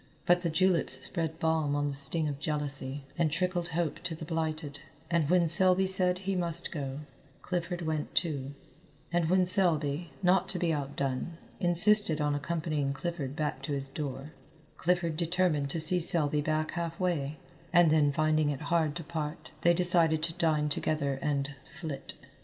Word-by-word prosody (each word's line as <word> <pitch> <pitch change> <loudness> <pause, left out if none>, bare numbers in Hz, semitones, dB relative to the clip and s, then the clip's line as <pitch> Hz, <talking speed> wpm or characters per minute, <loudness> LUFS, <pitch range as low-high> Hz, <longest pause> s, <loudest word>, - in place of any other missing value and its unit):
But 175 0 +3
the 170 - -1
juleps 180 +1 +2
spread 160 -3 -3
balm 160 -3 0
on 145 0 0
the - - -4
sting 140 +3 0
of 140 -1 -4
jealousy, 145 -2 -3 0.2
and 165 -2 +2
trickled 175 +1 -1
hope 170 -2 -2
to 165 - -5
the 155 - -8
blighted, 155 -3 -4 0.3
and 165 -4 +1
when 175 -1 +3
Selby 185 +3 +4
said 185 -1 +4
he 190 +1 -3
must 170 -1 -1
go, 140 -2 -5 0.4
Clifford 175 0 -3
went 155 -2 -3
too, 140 -5 -2 0.6
and 170 -2 +1
when 185 0 +3
Selby, 170 -4 +2
not 180 0 +2
to 190 - -3
be 170 -2 0
outdone, 140 +2 -4 0.2
insisted 175 -1 +4
on 150 -1 0
accompanying 150 -1 -2
Clifford 140 -1 -5
back 150 -3 -3
to 145 +2 -4
his 135 -1 -4
door, 140 0 -6 0.4
Clifford 175 -2 0
determined 170 -4 0
to 165 - -3
see 170 +3 +2
Selby 155 -3 +7
back 155 +1 -1
half 170 -1 -5
way, 155 -5 -2 0.3
and 175 -2 +5
then 150 -2 +3
finding 155 0 +1
it 145 0 -4
hard 160 -3 +1
to 170 - -5
part, 155 0 -6
they 170 0 +4
decided 170 -3 +3
to 165 0 -1
dine 155 -2 0
together 140 -2 -2
and 140 -1 -2
"flit." 140 -3 -8
160 Hz, 170 wpm, -29 LUFS, 145-175 Hz, 0.6 s, Selby